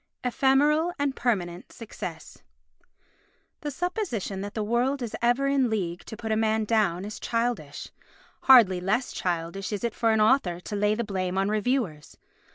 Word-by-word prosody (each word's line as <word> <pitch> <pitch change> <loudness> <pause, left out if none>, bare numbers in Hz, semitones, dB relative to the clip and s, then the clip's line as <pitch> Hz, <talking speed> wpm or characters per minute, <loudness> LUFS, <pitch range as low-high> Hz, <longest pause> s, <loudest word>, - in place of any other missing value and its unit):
Ephemeral 285 +6 +3
and 285 -1 -1
Permanent 180 -7 -2
Success 170 -8 -8 1.2
The 295 - -4
supposition 290 - -3
that 205 +1 -6
the 215 - -1
world 245 +5 0
is 230 - -4
ever 245 +3 +2
in 275 -3 +2
league 180 -6 -3
to 220 - -8
put 220 0 -4
a - - +3
man 220 0 +1
down 200 -5 +1
is 210 - -7
childish. 230 -12 -2 0.6
Hardly 215 -9 +7
less 215 +7 0
childish 175 +3 -3
is 205 0 -3
it 235 -2 -1
for 230 - +1
an 220 -1 +3
author 215 -6 +3
to 195 +3 -6
lay 210 +1 +2
the 235 - -1
blame 190 -3 -2
on 195 +1 +1
reviewers. 215 - -1
220 Hz, 165 wpm, -26 LUFS, 190-250 Hz, 1.2 s, Hardly